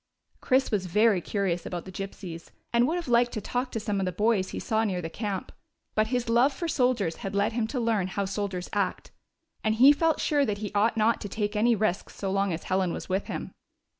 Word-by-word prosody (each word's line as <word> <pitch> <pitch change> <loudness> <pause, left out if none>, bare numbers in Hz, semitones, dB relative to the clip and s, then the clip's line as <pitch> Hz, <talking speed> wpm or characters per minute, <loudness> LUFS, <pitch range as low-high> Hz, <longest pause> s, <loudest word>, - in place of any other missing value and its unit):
Chris 265 0 +2
was 195 -4 0
very 210 +1 +3
curious 185 -2 -1
about 175 -1 -5
the 190 - -8
Gypsies, 185 -3 -7 0.2
and 235 +1 +4
would 320 - 0
have 350 -3 -3
liked 240 0 +3
to - - -2
talk 250 +4 -2
to 225 - -2
some 210 -2 -2
of 190 - 0
the - - 0
boys 205 0 +1
he - - -6
saw 220 -1 0
near 190 -5 -1
the 165 -2 -5
camp; 205 -3 -4 0.4
but 215 0 +2
his 245 0 -1
love 240 +5 +4
for 335 +5 -4
soldiers 245 - +1
had 195 0 -5
led 205 +3 +1
him 225 -1 0
to 250 +2 -3
learn 225 -5 +1
how 200 +1 -2
soldiers 195 -2 -3
act, 200 -3 -1 0.5
and 220 0 +2
he 260 +5 +8
felt 320 +1 +1
sure 290 -2 +2
that 210 -6 -1
he 205 -1 -5
ought 215 +3 +2
not 220 +1 +2
to 205 - -5
take 210 +1 -2
any 230 +3 +4
risks 210 -3 -1
so 195 -1 -3
long 195 0 +1
as 165 - -4
Helen 185 -1 0
was - - -6
with 190 +2 -1
him. - - -5
210 Hz, 235 wpm, -27 LUFS, 190-235 Hz, 0.5 s, he